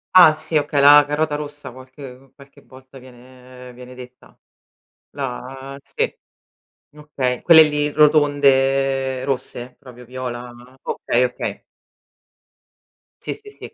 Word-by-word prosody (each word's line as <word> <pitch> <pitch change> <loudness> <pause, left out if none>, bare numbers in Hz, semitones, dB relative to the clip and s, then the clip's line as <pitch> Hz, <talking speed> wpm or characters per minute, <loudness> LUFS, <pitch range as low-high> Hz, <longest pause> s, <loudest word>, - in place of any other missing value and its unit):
Ah 175 -4 +9
sì, 155 0 -3
okay 145 -1 -1
la 145 +1 +7
carota 150 +1 -2
rossa 145 -3 -7
qualche 130 +1 -14
qualche 140 -1 -19
volta 130 0 -17
viene 125 0 -15
viene 125 +1 -13
detta 125 0 -15 0.7
la 135 0 -8 0.2
sì, - - -2 0.8
okay 135 -4 -4
quelle 160 -2 +8
lì 150 -1 0
rotonde 135 -3 +2
rosse, 130 -2 -5
proprio 125 -1 -15
viola, 125 -1 -7 0.3
okay, 120 - -1
okay. 125 0 -4 1.6
Sì, - - -4
sì, 420 -1 -15
sì. - - -13
135 Hz, 115 wpm, -19 LUFS, 125-145 Hz, 1.6 s, Ah